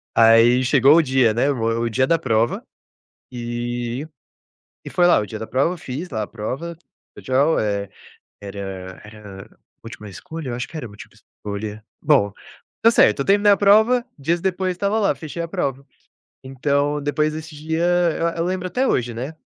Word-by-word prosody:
Aí 115 +2 +5
chegou 135 +3 +5
o 170 - +6
dia, 130 -4 +2
né. 135 +6 +1
Mo 115 -4 -2 0.2
o 120 - 0
dia 130 +3 +1
da 165 - +2
prova. 115 -5 0 0.7
E 120 +2 -4 0.8
e - - -6
foi 175 - +2
lá 175 - +5
o 105 - -2
dia 110 +2 -7
da 110 - -5
prova. 140 +8 0
Fiz 150 +4 -6
lá 110 -4 -3
a - - -6
prova. 135 +10 -6 0.4
Legal, 140 +5 +1
eh, 100 -2 -2 0.5
"era 95 -2 -7
era 105 -3 -12 0.3
múltipla 105 -2 -10
escolha. 160 - -8
Eu - - -3
acho 125 - -4
que 165 - -9
era 135 -7 -6
múltipla 110 +2 -14 0.2
escolha". 105 +1 -6 0.2
Bom, 125 -10 +3 0.5
tá 230 - +7
certo. 105 - +4
Eu - - -2
terminei 205 +1 +4
a - - +1
prova, 220 +5 +4
dias 165 +5 0
depois, 185 0 -1
estava 200 +4 -1
lá: 200 - +1
fechei 160 +2 -7
a 170 - -4
prova. 140 -8 -3 0.6
Então, 140 +2 -1
depois 150 +1 0
desse 155 0 -8
dia, 160 +3 -2 0.4
eu 165 - +1
eu 165 - 0
lembro 185 0 -2
até 250 +9 0
hoje, 120 -1 0
né, 130 +7 -6
135 Hz, 180 wpm, -21 LUFS, 115-165 Hz, 0.8 s, tá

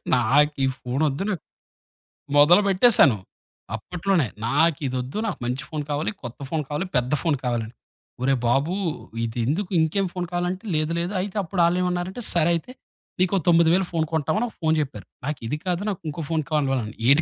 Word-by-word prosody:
నాకీ 135 +4 +3 0.2
ఫోనొద్దు 140 +5 -1
నాక్ 185 -7 -3 0.9
మొదలుపెట్టేసాను. 180 - +6 0.6
అప్పట్లోనే, 175 - 0 0.2
నాకు 160 +5 +3
ఇదొద్దు 130 +4 -3
నాకు 205 - -2
మంచి 125 +4 -2
ఫోను 155 -2 -3
కావాలి, 145 +6 0
కొత్త 120 -1 -7
ఫోను 160 -1 -1
కావాలి, 150 +5 -2
పెద్ద 125 +1 +1
ఫోను 160 -5 +1
కావాలని. 120 -2 -2 0.5
"ఓరే 135 +2 +3
బాబు! 135 +9 +2 0.5
ఇదెందుకు?" 125 - -1
ఇంకేం 160 +5 +2
ఫోను 180 -1 -3
కావాలంటే, 175 +1 -2
లేదు 155 +1 0
లేదు. 175 +4 -2
అయితే 195 +1 -5
అప్పుడు 175 +1 -1
ఆళ్ళేమన్నారంటే 180 +4 0
సరే 170 0 +3
అయితే, 170 +9 -5 0.5
నీకో 185 +1 +3
9000 170 +2 +5
ఫోను 165 -2 +1
కొంటామని 160 +9 +1
ఒక - - -19
ఫోను 160 -1 +2
జెప్పారు. 145 -2 -4 0.2
నాకిది 145 -2 -3
కాదు 180 0 0
నాకు 195 - -4
ఇంకో 150 +3 -5
ఫోను 160 -3 0
కావాలని. 135 -7 0
ఏది 140 +4 +6
160 Hz, 155 wpm, -24 LUFS, 135-180 Hz, 0.9 s, మొదలుపెట్టేసాను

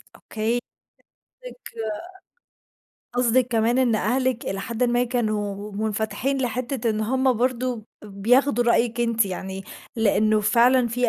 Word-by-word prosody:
أوكي. 225 +2 -2 0.8
قصدِك - - -9 1.6
قصدِك 245 0 +3
كمان 235 +1 +2
إن 245 -3 +3
أهلِك 250 +3 0
إلى 195 - -3
حدٍ 235 +4 -1
ما 240 0 +2
كانوا 210 -4 -2
منفتحين 220 +6 -2
لحتّة 245 -1 -1
إن 215 - -2
هم 260 +4 +2
برضه 250 +1 0
ب 215 -1 -12 0.4
بياخدوا 245 +1 +3
رأيِِك 235 0 +2
أنتِ 230 -2 +2
يعني 190 +1 -6 0.3
لإنّه 215 0 +3
فعلًا 240 +3 +4
في 245 +1 0
235 Hz, 125 wpm, -24 LUFS, 215-250 Hz, 1.6 s, فعلًا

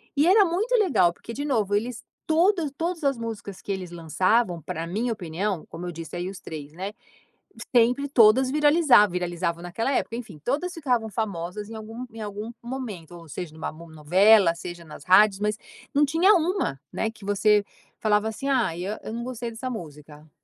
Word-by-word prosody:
E 295 +3 +3
era 405 +3 +7
muito 405 +9 0
legal, 285 - +3
porque, 230 - -10
de 285 +3 -4
novo, 215 -8 +1
eles 230 +3 -2 0.2
todas 335 0 +2
todas 335 0 -2
as 275 -3 +2
músicas 220 -4 -6
que 200 - -5
eles 185 -3 -4
lançavam, 175 +3 +1
pra 165 +3 -5
minha 230 +7 -1
opinião, 185 -1 -3
como 170 +2 -7
eu 175 - -4
disse 165 -1 -8
aí 175 +1 -3
os 195 - -9
3, 150 -2 -8
né, 195 +4 -5 0.8
sempre 245 +4 +4
todas 255 0 +5
viralizavam, 295 - +5
viralizavam 175 -1 -2
naquela 225 +10 -2
época, 230 - -1
enfim, 215 -9 -8
todas 310 +8 -1
ficavam 250 -8 0
famosas 205 -2 -4
em - - -8
algum 225 +3 -7
em 225 -1 -9
algum 210 +2 -5
momento, 235 -10 -6
ou 170 -1 -12
seja, 175 -1 -6
numa 160 - -4
no 165 +2 -12
novela, 180 +5 +5
seja 175 0 -8
nas 150 - -11
rádios, 195 +1 +6
mas 210 +1 0 0.4
não 290 +1 +4
tinha 335 +8 +4
uma, 345 - 0
né, 220 - -1
que 215 -3 -14
você 205 +1 +3 0.3
falava 210 0 +2
assim: 270 +5 -5
“Ah, 245 -11 +1
e 175 - -4
eu 210 +2 -3 0.2
não 235 +1 -4
gostei 245 -1 -5
dessa 235 +3 -6
música.” 150 - -9
215 Hz, 190 wpm, -25 LUFS, 175-255 Hz, 0.8 s, era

